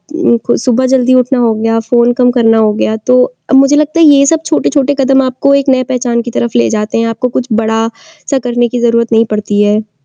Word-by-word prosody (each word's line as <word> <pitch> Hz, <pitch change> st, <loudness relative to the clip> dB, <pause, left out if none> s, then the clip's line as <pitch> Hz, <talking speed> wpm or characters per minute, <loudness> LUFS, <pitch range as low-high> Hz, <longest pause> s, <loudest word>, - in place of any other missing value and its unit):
उम, 330 Hz, -8 st, +1 dB
खु 240 Hz, -, +1 dB
सुबह 255 Hz, +1 st, 0 dB
जल्दी 255 Hz, -1 st, +1 dB
उठना 255 Hz, 0 st, +1 dB
हो 230 Hz, -2 st, +1 dB
गया, 225 Hz, +1 st, -1 dB
फ़ोन 235 Hz, +1 st, +1 dB
कम 245 Hz, 0 st, +1 dB
करना 225 Hz, -2 st, +2 dB
हो 215 Hz, -1 st, +2 dB
गया। 220 Hz, +1 st, -2 dB
तो 250 Hz, +3 st, +2 dB, 0.3 s
अ, -, -, 0 dB
मुझे 275 Hz, +2 st, +4 dB
लगता 305 Hz, +2 st, 0 dB
है 330 Hz, -, +5 dB
ये 280 Hz, -2 st, +5 dB
सब 320 Hz, +3 st, +1 dB
छोटे-छोटे 285 Hz, -3 st, 0 dB
कदम 270 Hz, 0 st, +2 dB
आपको 260 Hz, +2 st, 0 dB
एक 280 Hz, 0 st, 0 dB
नए 260 Hz, -1 st, +2 dB
पहचान 245 Hz, -2 st, -2 dB
की 240 Hz, 0 st, -7 dB
तरफ 235 Hz, 0 st, -3 dB
ले 235 Hz, -, +2 dB
जाते 210 Hz, 0 st, -3 dB
हैं 230 Hz, 0 st, 0 dB
आपको 240 Hz, +3 st, -3 dB
कुछ 250 Hz, -, -3 dB
बड़ा-सा 225 Hz, +5 st, -4 dB
करने 240 Hz, 0 st, 0 dB
की 245 Hz, -, -3 dB
ज़रूरत 235 Hz, 0 st, 0 dB
नहीं 225 Hz, 0 st, +3 dB
पड़ती 205 Hz, -1 st, -2 dB
है। 210 Hz, +1 st, -1 dB
240 Hz, 235 wpm, -11 LUFS, 225-265 Hz, 0.3 s, है